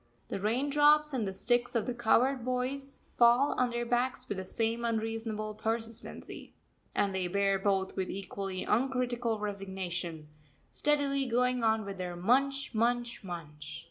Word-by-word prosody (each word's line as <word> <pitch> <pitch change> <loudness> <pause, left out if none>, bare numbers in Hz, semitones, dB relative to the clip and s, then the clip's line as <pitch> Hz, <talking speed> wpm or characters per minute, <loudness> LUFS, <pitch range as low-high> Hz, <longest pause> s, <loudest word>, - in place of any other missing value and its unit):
The - - -3
raindrops 290 +7 +3
and 230 -6 0
the 190 - -3
sticks 240 +3 +1
of 225 - +1
the 250 - -2
cowherd 240 +2 +3
boys 255 +2 -3 0.2
fall 240 +4 +6
on 250 -1 +3
their 240 0 -2
backs 245 +2 0
with 200 - -3
the 190 - -5
same 230 +4 -1
unreasonable 225 -1 -2
persistency, 225 +1 -5 0.4
and 200 -1 +1
they 185 -1 0
bear 195 +1 +2
both 195 -1 0
with 190 -1 -2
equally 195 -1 -4
uncritical 245 -1 0
resignation, 190 -6 -4 0.4
steadily 280 -2 +2
going 250 0 +1
on 220 -1 +2
with 195 -1 -6
their 180 -1 -3
munch, 275 +9 +1
munch, 235 +1 0
munch. 150 -5 -7
230 Hz, 145 wpm, -31 LUFS, 195-250 Hz, 0.4 s, fall